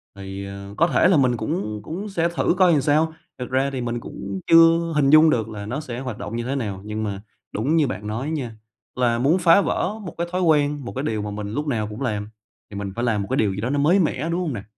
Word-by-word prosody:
Thì, 100 0 -7
ờ, 100 0 -8
có 170 - +4
thể 155 +3 +3
là 185 - +4
mình 125 -4 +2
cũng 110 - -3
cũng 195 - -5
sẽ 170 -3 0
thử - - +2
coi 185 -2 +5
làm 145 -4 +3
sao, 155 +3 +2 0.2
thật 125 - -5
ra 135 +2 +1
thì 130 - -3
mình 120 0 -2
cũng 100 -4 -6
chưa 165 0 +5
hình 140 -2 +3
dung 155 +1 +7
được 115 -6 0
là 105 -2 -7
nó 120 +7 -3
sẽ 125 -5 -6
hoạt 125 -5 -5
động 105 +3 -6
như 120 - -2
thế 135 +3 -2
nào, 100 -7 -3
nhưng 110 +1 -3
mà 100 -2 -4 0.3
đúng 130 +10 0
như 155 -3 +3
bạn 105 0 -5
nói 120 +7 -3
nha, 125 -8 -4 0.4
là 120 -2 +1
muốn 150 +8 +3
phá 175 +3 +6
vỡ 195 - -1
một 175 - -7
cái 170 +1 -2
thói 185 - -1
quen, 145 -5 +2
một - - -6
cái 135 - -2
điều 110 -7 -1
mà 105 0 -4
mình 105 0 -5
lúc 150 +4 -2
nào 110 -6 -1
cũng 105 +4 -8
làm 105 -5 -2 0.4
thì 100 - -10
mình 100 -1 -5
phải 120 - -2
làm 110 -4 +1
một 100 - -5
cái - - 0
điều 100 -3 +2
gì 100 - -4
đó 120 - -2
nó 145 - 0
mới 170 +7 +4
mẻ, 160 -2 0
đúng 170 +1 -1
hông 165 -6 -2
nè? 100 -4 -6
130 Hz, 280 wpm, -23 LUFS, 105-155 Hz, 0.4 s, dung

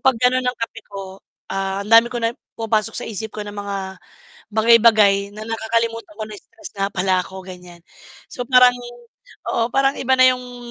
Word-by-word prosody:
'pag 265 -3 +3
gano'n 250 +1 +2
ng 250 0 -1
kape 225 0 -5
ko, 195 -1 -8 0.3
ah, 195 0 -2
dami 230 +2 +6
ko 240 - -2
na 230 0 0 0.2
pumapasok 225 -1 0
sa - - -3
isip 220 0 -4
ko - - -4
ng 205 - -8
mga 200 -1 -4 0.8
bagay-bagay 215 -3 +4
na 215 - -8
nakakalimutan 225 0 -2
ko 220 - -6
na 215 -1 -9
stress 340 - -10
nga 195 0 0
pala 185 0 +1
ako, 190 0 -10
ganiyan. 180 -2 -12 0.5
So 245 - -5
parang 250 -1 +6 0.7
oo, 230 - +1
parang 270 0 +2
iba 260 0 +2
na - - +7
'yong 245 -1 -4
225 Hz, 180 wpm, -20 LUFS, 200-245 Hz, 0.8 s, na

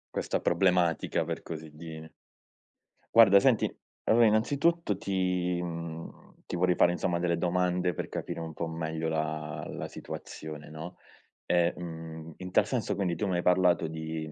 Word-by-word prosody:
Questa - - 0
problematica, 90 -4 +2
per - - -4
così 80 -1 -7
dire. 80 0 -9 1.1
Guarda, 100 -4 +9
senti, 125 -2 +3 0.3
allora, 115 +1 +5
innanzitutto, 135 - +2
ti 90 -2 0
mhmm, 85 -1 -7
ti - - -3
vorrei 90 +1 +3
fare, 85 0 +4
insomma, 85 0 0
delle 85 -1 +1
domande 90 0 +1
per - - -5
capire - - -4
un 80 -1 -5
po' 85 - -2
meglio 80 0 -3
la 80 -1 -2
la - - -5
situazione, 75 -1 -8
no? 80 +3 -8 0.5
Ehm, 85 0 +3
mhmm, 80 -1 -7
in 90 0 -7
tal - - +4
senso, - - -1
quindi, 90 -4 -1
tu 105 - -2
mi 95 -3 0
hai - - +1
parlato 90 -2 +3
di 80 -1 -5
85 Hz, 155 wpm, -29 LUFS, 80-90 Hz, 1.1 s, Guarda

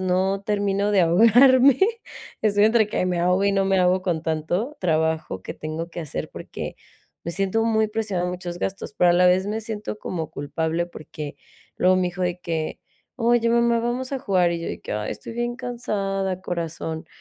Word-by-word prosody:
no 190 +2 +1
termino 205 0 0
de 195 - +5
ahogarme, 245 +9 +6 0.6
estoy 205 -1 +4
entre 220 -1 +4
que 185 -3 -1
me 175 -1 0
ahogo 180 +3 +2
y 200 - +3
no 195 0 +2
me 195 -1 +2
ahogo 185 +1 +3
con 170 -4 -1
tanto 175 - -2
trabajo 160 - 0
que - - -6
tengo 160 +2 -5
que 170 - -6
hacer, 155 -4 -5
porque - - -7 0.5
me 170 - -3
siento 195 +4 0
muy 220 -1 +2
presionada 205 -5 -2
en 180 - -2
muchos 175 -1 -6
gastos, 195 0 -4
pero 175 -1 +5
a - - +5
la 180 +1 +5
vez 185 +2 +3
me 215 +2 -2
siento 215 -1 -5
como 165 -6 -4
culpable, 160 +4 -2
porque 155 -3 -8 0.4
luego 185 +1 +4
mi 180 -1 +1
hijo 185 +1 -5
de 180 0 -1
que: 160 -2 -3 0.4
"Oye 235 -1 +2
mamá, 235 0 +3
vamos 245 +3 -2
a 270 - -1
jugar", 185 -7 +2
y 170 - -3
yo - - -4
de - - -6
que, - - -6
"ay 105 0 -2
estoy - - -9
bien 240 0 -2
cansada 195 -7 -2
corazón". 165 -2 -4
185 Hz, 195 wpm, -23 LUFS, 170-220 Hz, 0.6 s, ahogarme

